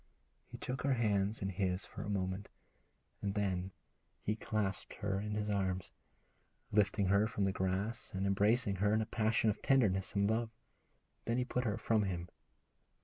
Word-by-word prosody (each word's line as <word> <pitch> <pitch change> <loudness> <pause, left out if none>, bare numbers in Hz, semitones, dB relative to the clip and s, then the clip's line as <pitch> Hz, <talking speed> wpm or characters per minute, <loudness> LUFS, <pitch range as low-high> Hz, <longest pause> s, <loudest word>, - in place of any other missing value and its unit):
He - - -9
took 125 0 -4
her 135 -1 +2
hands 105 -2 +1
in 95 - 0
his 95 0 -1
for - - -8
a - - -4
moment, 95 0 -2 0.7
and 100 0 -2
then 95 -2 0 0.5
he 105 - 0
clasped 105 -4 -2
her 100 -2 -1
in 105 +1 -3
his 105 0 -1
arms, 95 -3 -1 0.8
lifting 100 -1 +3
her 100 +2 +4
from 105 -2 -2
the 95 - +2
grass 95 +5 -2
and 95 +1 -2
embracing 100 +2 +3
her 105 +3 +3
in 110 - +2
a - - 0
passion 110 0 +2
of 105 - -7
tenderness 105 -9 +3
and 100 0 +3
love. 110 +1 +1 0.8
Then 115 +1 +1
he 125 - +1
put 125 0 -1
her 105 -1 0
from 115 -1 +2
him. 90 -2 -3
100 Hz, 175 wpm, -35 LUFS, 95-110 Hz, 0.8 s, her